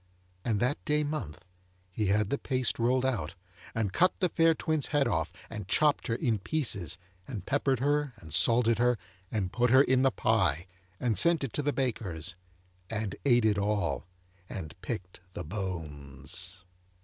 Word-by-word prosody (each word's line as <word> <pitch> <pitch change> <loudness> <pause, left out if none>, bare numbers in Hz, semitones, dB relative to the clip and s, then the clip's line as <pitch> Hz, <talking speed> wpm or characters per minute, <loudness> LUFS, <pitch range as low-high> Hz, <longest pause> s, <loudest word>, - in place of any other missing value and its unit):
And 110 -4 0
that 125 +6 0
day 150 0 +1
month, 90 - -5 0.5
he 105 +3 -1
had 105 +1 +2
the 140 - 0
paste 130 -2 0
rolled 125 +2 +2
out, 105 -12 -1 0.4
and 105 -4 -1
cut 180 +1 +3
the 180 - +2
fair 165 0 +4
twin's 155 -3 0
head 145 -3 +2
off, 80 -7 0 0.2
and 105 -4 -7
chopped 150 +8 +2
her 115 - 0
in 115 -3 0
pieces, 100 - -1 0.3
and 110 -8 -6
peppered 135 -1 +1
her, 145 -1 +1
and 80 -8 -9
salted 115 +6 +5
her, 125 0 +3 0.3
and 95 -5 -2
put 125 0 +2
her 130 +3 +7
in 130 -2 +3
the 135 - +5
pie, 95 - +1 0.3
and 115 -6 +1
sent 170 +1 +4
it 135 - -3
to - - 0
the 145 0 +1
baker's, 100 - -2 0.6
and 110 -3 -3
ate 120 -4 +4
it 105 -2 +3
all, 95 -11 -1 0.4
and 80 -6 -6
picked 90 0 -5
the - - -5
bones. 85 -1 -6
110 Hz, 170 wpm, -30 LUFS, 90-130 Hz, 0.6 s, her